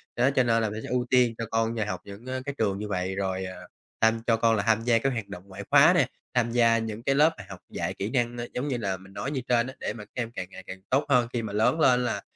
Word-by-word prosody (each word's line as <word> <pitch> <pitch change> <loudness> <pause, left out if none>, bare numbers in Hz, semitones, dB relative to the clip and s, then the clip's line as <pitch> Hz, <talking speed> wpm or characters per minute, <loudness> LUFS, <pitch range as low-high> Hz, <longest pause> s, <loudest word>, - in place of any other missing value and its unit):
Đó, 125 +2 +3
cho 130 - +5
nên 115 -1 +2
là 110 - 0
mình 105 +1 -5
sẽ - - -7
ưu 125 0 0
tiên 125 -2 +4
cho 115 - -3
con 115 0 +1
nhà 110 -2 -1
học 105 - -3
những, 100 +4 -11
ơ, 130 0 -3
cái 140 - -4
trường 100 -3 0
như 105 - -4
vậy 95 -1 -2
rồi, 95 -1 -2
ờ, 95 0 -9 0.3
tham 110 0 +3
cho 115 - +4
con 115 0 +3
là 100 - 0
tham 115 -1 +3
gia 115 -1 +3
các 135 +4 +1
hoạt 115 -4 -4
động 100 -3 -9
ngoại 100 +1 -8
khóa - - +7
nè, - - +3 0.3
tham 120 -2 +1
gia 115 -1 +4
những 110 0 -4
cái 135 +1 +2
lớp 155 +3 +5 0.2
học - - -9
dạy - - -3
kỹ 100 - -4
năng, 120 -1 0
a, 120 - -3
giống 125 +4 -2
như 130 -4 -1
là 100 -5 -2
mình 95 +1 -16
nói 135 +6 -4
như 135 -3 -2
trên 120 0 +3
á, 130 - -7
để - - -3
mà 110 - -9
các - - -34
em 115 -1 -4
càng 95 -6 -5
ngày 95 - -11
càng 95 0 -7
tốt 135 +3 +2
hơn. 125 -3 +4
Khi 120 - 0
mà 110 -3 -5
lớn 110 +9 +2
lên 125 -4 +4
là 120 - -2
115 Hz, 310 wpm, -27 LUFS, 105-125 Hz, 0.3 s, khóa